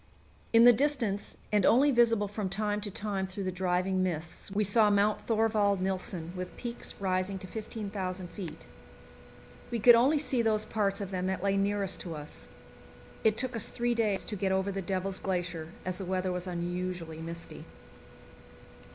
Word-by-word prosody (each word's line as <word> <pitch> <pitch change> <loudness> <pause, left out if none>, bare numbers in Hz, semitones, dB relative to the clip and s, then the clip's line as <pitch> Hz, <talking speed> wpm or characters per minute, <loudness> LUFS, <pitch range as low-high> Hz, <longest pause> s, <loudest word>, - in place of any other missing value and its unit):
In 230 0 +7
the 245 0 +9
distance, 235 -6 0
and 210 -2 +3
only 275 +8 +5
visible 230 -4 +4
from 205 -1 -3
time 210 +1 -1
to 205 - -3
time 200 -1 -2
through 190 +1 -5
the 185 - -1
driving 185 +1 0
mists, 170 -1 -3
we 205 +2 +1
saw 210 +1 +4
Mount 205 +1 +2
Thorvald 215 -3 +2
Nilsen, 185 -2 -3
with 180 0 -6
peaks 240 -1 -4
rising 185 0 0
to 190 - -8
15,000 195 -3 -5
feet. 165 -5 -7 1.0
We 235 - -1
could 240 +2 +8
only 260 +6 +5
see 260 -4 +1
those 215 -1 +1
parts 205 -2 0
of 195 -1 -5
them 185 -1 -1
that 190 -1 -2
lay 200 0 +2
nearest 200 -1 0
to 170 -3 -5
us. 150 0 -9 0.7
It 220 0 +3
took 255 -1 -2
us 225 - -1
three 240 0 0
days 215 -4 0
to 210 - -4
get 190 -1 0
over 190 +1 +1
the 195 0 -3
Devil's 190 +1 -2
Glacier, 175 -4 -2 0.2
as 185 0 -3
the 190 - -4
weather 185 0 -1
was 180 0 -4
unusually 175 -2 -4
misty. 165 +1 -7
195 Hz, 175 wpm, -30 LUFS, 185-215 Hz, 1.0 s, the